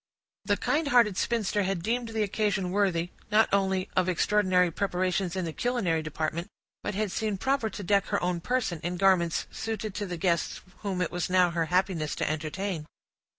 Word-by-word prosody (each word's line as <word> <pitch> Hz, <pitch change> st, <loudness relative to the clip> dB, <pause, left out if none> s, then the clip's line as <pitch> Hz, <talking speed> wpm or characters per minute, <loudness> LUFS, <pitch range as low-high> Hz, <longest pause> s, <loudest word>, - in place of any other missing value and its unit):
The -, -, +2 dB
kind 305 Hz, +1 st, 0 dB
hearted 235 Hz, -7 st, +4 dB
spinster 210 Hz, -1 st, 0 dB
had 190 Hz, -3 st, -1 dB
deemed 235 Hz, +3 st, 0 dB
the 220 Hz, -1 st, 0 dB
occasion 200 Hz, -2 st, 0 dB
worthy, 180 Hz, -4 st, +1 dB, 0.2 s
not 215 Hz, +1 st, +5 dB
only 190 Hz, -1 st, +2 dB
of 185 Hz, 0 st, +2 dB
extraordinary 185 Hz, -1 st, +3 dB
preparations 185 Hz, 0 st, -1 dB
in 185 Hz, -2 st, -1 dB
the 165 Hz, -, -4 dB
culinary 210 Hz, -10 st, 0 dB
department, 155 Hz, +2 st, -3 dB, 0.3 s
but 205 Hz, -, -3 dB
had 210 Hz, -1 st, -1 dB
seen 215 Hz, -1 st, -1 dB
proper 265 Hz, +1 st, 0 dB
to 205 Hz, +1 st, -7 dB
deck 200 Hz, +1 st, +2 dB
her -, -, 0 dB
own 180 Hz, -1 st, 0 dB
person 230 Hz, -7 st, -1 dB
in 175 Hz, +1 st, -3 dB
garments 180 Hz, -3 st, +3 dB
suited 220 Hz, -2 st, -4 dB
to 205 Hz, 0 st, -3 dB
the 175 Hz, -1 st, -4 dB
guests 170 Hz, -1 st, 0 dB, 0.2 s
whom 195 Hz, -3 st, -2 dB
it -, -, -3 dB
was 175 Hz, +1 st, -2 dB
now 180 Hz, -1 st, +4 dB
her 170 Hz, -1 st, 0 dB
happiness 180 Hz, -3 st, 0 dB
to -, -, -1 dB
entertain. 155 Hz, +2 st, -3 dB
190 Hz, 185 wpm, -28 LUFS, 175-210 Hz, 0.3 s, not